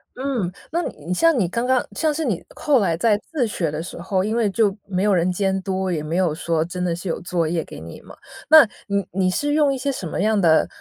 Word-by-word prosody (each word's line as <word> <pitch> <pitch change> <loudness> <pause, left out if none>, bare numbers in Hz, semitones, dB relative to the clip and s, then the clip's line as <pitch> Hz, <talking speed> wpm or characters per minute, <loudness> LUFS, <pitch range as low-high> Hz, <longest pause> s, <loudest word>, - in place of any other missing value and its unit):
嗯， 255 -9 -2 0.2
那 340 +2 0
你 150 - -7
你 180 - 0
像 330 - +3
你 185 -6 +2
刚 235 +7 -2
刚 255 -1 +2
像 315 -2 0
是 315 +1 -2
你 205 -10 -2
后 285 -4 +2
来 170 -5 +1
在 210 +1 +3
自 285 -6 +1
学 185 -7 -2
的 150 +2 -4
时 175 - -8
候， 190 +1 0
因 215 +3 -1
为 225 -4 +2
就 205 -1 +1
没 190 0 -1
有 210 - +3
人 180 0 +2
监 190 +1 0
督， 190 -1 -2
也 160 - -1
没 155 +2 -4
有 180 -4 +2
说 165 0 -1
真 180 +1 -5
的 175 -2 0
是 175 +3 -7
有 165 - -2
作 170 -2 -1
业 165 0 -1
给 - - -11
你 80 +1 -10
嘛。 - - -14 0.3
那， 310 -6 +9 0.2
你 200 -1 -1
你 185 -1 +1
是 290 +10 -1
用 295 -2 +3
一 - - -3
些 275 +2 -1
什 195 -9 -5
么 160 - -3
样 215 +1 +2
的 165 -4 +4
190 Hz, 285 characters per minute, -22 LUFS, 175-240 Hz, 0.3 s, 那